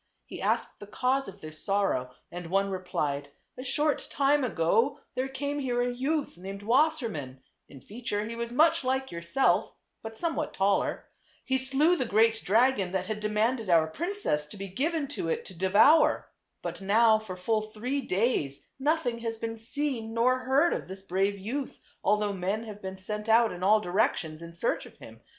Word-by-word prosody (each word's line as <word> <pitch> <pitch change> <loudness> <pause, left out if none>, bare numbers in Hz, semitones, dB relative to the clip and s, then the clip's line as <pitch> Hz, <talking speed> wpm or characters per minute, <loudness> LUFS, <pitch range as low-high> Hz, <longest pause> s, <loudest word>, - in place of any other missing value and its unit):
He - - -8
asked - - -1
the 205 - -10
cause 260 +5 0
of 195 - -11
their 155 - -8
sorrow 155 -6 0 0.2
and 175 -1 -6
one 195 +2 +1
replied, 145 -6 -2
" - - -48
A - - -5
short 290 +3 0
time 285 +1 +2
ago 230 - +1
there 260 0 -1
came 285 +2 -3
here 250 -3 -1
a 245 0 +1
youth 275 - -2
named 195 +2 -7
Wasser 275 +4 +3
mann; 135 - -7 0.3
in 135 -2 -13
feature 210 - -4
he 230 +2 -5
was 235 0 -4
much 310 +6 +4
like 265 +1 -1
yourself, 175 +3 +1 0.3
but 225 0 -8
somewhat 320 -1 -2
taller. 195 +1 +1 0.4
He 265 0 +1
slew 275 +6 +3
the 255 -7 -1
great 225 +1 +3
dragon 210 -2 +3
that 190 -1 0
had 215 +2 -3
demanded 215 +1 0
our 165 -2 +5
princess 285 - -2
to 205 - -11
be 195 0 -6
given 290 - -1
to 230 -12 -3
it - - -2
to - - -7
devour. 200 - +4 0.3
But - - -5
now 220 +3 +4
for 195 -4 -8
full 215 +4 0
three 220 +6 -3
days 185 - 0
nothing 290 -4 0
has 230 -1 -3
been 225 0 -4
seen 230 -1 -3
nor 255 +2 +3
heard 270 +6 +3
of - - -4
this 190 +1 -8
brave 195 +2 0
youth, 250 +8 -4 0.2
although 210 0 +2
men 195 +4 -2
have 210 -2 -9
been 190 0 -6
sent 210 +3 -5
out 230 +1 +5
in 180 - -7
all 210 +3 +5
directions 175 - 0
in 170 0 -10
search 170 - -1
of - - -18
him. - - -13
220 Hz, 185 wpm, -28 LUFS, 190-260 Hz, 0.4 s, our